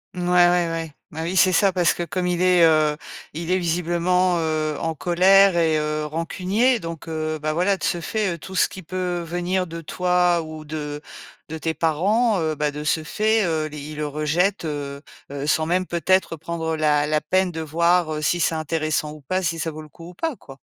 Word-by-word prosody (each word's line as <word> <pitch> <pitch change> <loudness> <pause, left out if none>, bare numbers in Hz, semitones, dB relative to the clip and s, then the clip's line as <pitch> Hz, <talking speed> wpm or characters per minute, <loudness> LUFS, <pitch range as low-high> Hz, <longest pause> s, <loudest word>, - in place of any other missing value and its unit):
Ouais, 180 - -4
ouais, 175 -1 +4
ouais, 165 -1 -4 0.2
bah 155 - -8
oui, 175 +3 -2
c'est 185 - +5
ça 195 +3 +3
parce 175 -3 +2
que - - -5
comme 175 +2 -2
il 180 -1 0
est, 180 -1 +5
heu, 155 -2 +3 0.4
il 165 +2 -4
est 185 - +3
visiblement, 175 +1 +1
heu, 155 -1 -1
en 165 -1 -2
colère 190 +3 +5
et 165 -2 +2
heu, 150 0 -1
rancunier, 185 - 0
donc, 165 -3 -7
heu, 155 -1 -3
bah, 155 +1 -2
voilà 185 +4 +1
de - - -11
ce 175 - 0
fait, 210 0 -1
heu, 170 - -6
tout 190 +4 -9
ce - - +4
qui 190 - -9
peut 180 0 -3
venir 175 +2 -2
de 165 0 -7
toi 180 +1 +1
ou 155 -1 -9
de 150 -1 -5 0.5
de 160 - -6
tes 160 0 -2
parents, 200 +8 +2
heu, 155 -1 -1
bah, 150 0 -1
de 150 +1 -6
ce 155 +1 0
fait, 215 +6 +1
heu, 160 -2 -1
les 150 0 -9
il 150 +1 -8
le 150 - -2
rejette, 160 +6 0
heu 140 -2 -5 0.3
heu, 140 0 -5
sans 155 +1 +1
même 185 +2 +1
peut-être 175 0 +1
prendre 160 0 -3
la 150 -2 +2
la 155 0 0
peine 185 +3 +1
de 160 -1 -5
voir, 170 +1 +2
heu, 150 - -4
si 175 - +1
c'est 165 - +1
intéressant 155 -1 -1
ou 155 - -12
pas, 185 +7 -2
si 165 -1 -1
ça 160 - -2
vaut 155 0 -8
le 155 - -14
coup 165 +3 -12
ou - - -12
pas 320 - -2
quoi. 135 -7 -14
165 Hz, 225 wpm, -22 LUFS, 155-180 Hz, 0.5 s, c'est